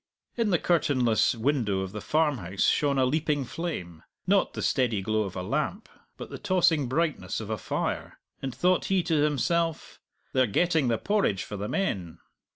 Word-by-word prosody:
In 230 -3 +1
the 180 - +3
curtainless 130 -11 +2
window 115 -5 0
of 95 -1 -4
the 105 - -6
farmhouse 130 - 0
shone 140 -2 +2
a 130 - +4
leaping 145 0 0
flame 105 - -5 0.2
not - - +2
the - - -3
steady 120 -5 +1
glow 110 +1 0
of 95 - -7
a 90 - -3
lamp, 150 - -2 0.3
but - - -8
the - - -7
tossing 175 -8 +2
brightness 155 +5 -1
of 110 -1 -6
a 110 - -1
fire - - -3 0.2
and 135 - -3
thought 180 +7 +2
he 190 -2 +1
to 160 -4 +1
himself, 160 +3 0 0.3
"They're 130 -1 +3
getting 160 - +2
the 115 -1 +2
porridge 195 - 0
for 105 - -7
the 100 +1 -4
men!" 95 - -2
140 Hz, 175 wpm, -27 LUFS, 110-165 Hz, 0.3 s, a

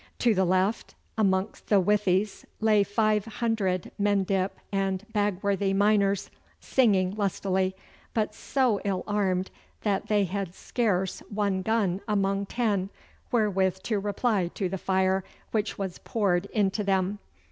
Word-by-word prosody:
To 235 -2 +3
the 190 -1 +2
left 185 +4 0 0.2
amongst 195 -1 0
the 205 - +5
withies 200 +1 +1 0.2
lay 215 -2 +4
five 210 0 +1
hundred 220 -6 -1
Mendip 195 -2 +2 0.2
and 195 0 -1
Bagworthy 200 -1 +1
miners, 200 -1 +2 0.3
singing 195 -7 +2
lustily, 190 -2 0 0.4
but 215 -1 0
so 245 -2 +1
ill 190 -2 -1
armed 190 -3 0 0.3
that 200 -2 0
they 210 -1 +3
had 190 -1 -3
scarce 190 -6 -1
one 200 -2 0
gun 200 -3 0
among 200 -1 0
ten 205 -6 0 0.4
wherewith 190 -5 +1
to 215 -3 0
reply 205 -1 0
to 195 - -1
the 190 +1 -4
fire 190 0 +1 0.3
which 215 -1 -1
was 190 -3 -4
poured 200 -4 0
into 205 -1 0
them. 195 +1 0
200 Hz, 130 wpm, -27 LUFS, 190-210 Hz, 0.4 s, the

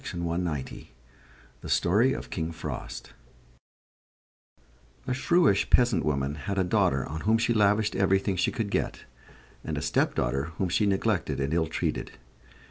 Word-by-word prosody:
THE 85 - -4 0.8
STORY 110 +9 +3
OF - - -7
KING 80 -1 -3
FROST 75 -5 -7 1.9
A 130 - -1
shrewish 140 - +2
peasant 120 -4 +3
woman 70 -2 -1 0.2
had 100 - -1
a 95 - +3
daughter 70 -6 +1
on 80 +1 -6
whom 110 +2 +3
she 120 +1 +1
lavished 105 0 +2
everything 95 0 +2
she 90 - +1
could 110 -4 -3
get, - - -1 0.6
and - - -4
a - - -2
stepdaughter 65 +3 0
whom 95 - 0
she 105 +4 +2
neglected 95 -8 0
and 70 +3 -1
ill 80 -1 +1
treated. - - -3
95 Hz, 135 wpm, -27 LUFS, 80-110 Hz, 1.9 s, STORY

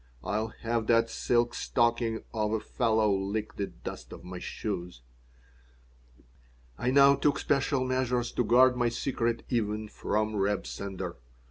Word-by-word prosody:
"I'll 110 +2 -1
have 115 -1 -1
that 115 -1 +3
silk 120 +1 +1
stocking 120 -2 0
of 105 -1 0
a 110 - +1
fellow 110 -1 +1
lick 100 +3 -3
the 100 - -1
dust - - -9
of - - -10
my 90 0 -7
shoes." 90 - -5 1.7
I 120 - -1
now 140 +1 +7
took 140 0 +1
special 140 -1 +1
measures 125 -1 0
to - - 0
guard 125 +2 +5
my 120 -1 +2
secret 120 -1 -1
even 110 -3 -1
from 110 0 -1
Reb 100 +1 0
Sender. 95 -4 -5
115 Hz, 140 wpm, -29 LUFS, 105-125 Hz, 1.7 s, now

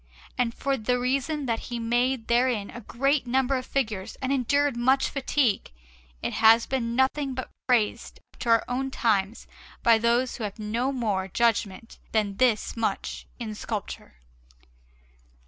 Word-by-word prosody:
And 245 -2 +1
for 275 -1 -1
the 250 +2 0
reason 275 +4 -1
that 230 -2 0
he 240 - -3
made 240 +1 0
therein 235 -4 +1
a 240 - -8
great 275 +5 0
number 265 +2 +2
of 255 -1 -3
figures 215 -8 -2
and 265 0 -2
endured 280 +1 +1
much 260 +3 +3
fatigue, 265 - 0 0.5
it - - -2
has 225 +1 +6
been 235 -3 -2
nothing 265 +1 +1
but 260 - -5 0.2
praised 235 -5 0
up - - -22
to 240 - -3
our 230 -1 +4
own 265 +2 -2
times 215 -4 0 0.4
by 230 -1 +5
those 235 +2 +1
who 230 - -5
have 205 0 -4
had 215 - -7
no 235 +5 0
more 210 -8 -1
judgment 225 0 -1
than 205 -3 0
this 245 -4 +2
much 230 -1 -3
in 225 -3 -5
sculpture. 210 - -6
240 Hz, 160 wpm, -26 LUFS, 225-260 Hz, 0.5 s, has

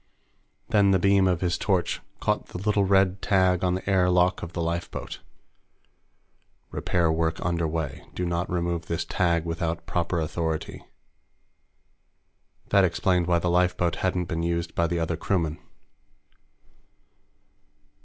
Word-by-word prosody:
Then 105 -3 +4
the 95 - +5
beam 100 +1 +4
of 90 -2 0
his 90 -2 0
torch 95 -4 0 0.2
caught - - -1
the - - -7
little 100 +1 +1
red 95 0 +3
tag 95 -3 +2
on 90 -1 +2
the 95 - -6
air 95 -2 +3
lock 90 0 +2
of 85 +1 -7
the 85 - -2
lifeboat. 85 +1 -4 1.5
Repair 85 -2 +1
Work 80 0 0
Under 85 -2 0
Way 80 -4 -4
Do 90 - -2
Not 85 +1 -2
Remove 85 -1 -2
This 85 - -2
Tag 85 -3 +1
Without 85 0 -3
Proper 85 0 -1
Authority. 80 0 -3 1.9
That 100 - +5
explained 90 -1 +1
why 85 -1 +3
the 85 +1 0
lifeboat 90 -1 +1
hadn't 90 -1 0
been 85 0 -3
used 85 0 -2
by 85 - +1
the 85 0 -1
other 80 0 -1
crewmen. 85 -3 -1
85 Hz, 140 wpm, -26 LUFS, 85-95 Hz, 1.9 s, the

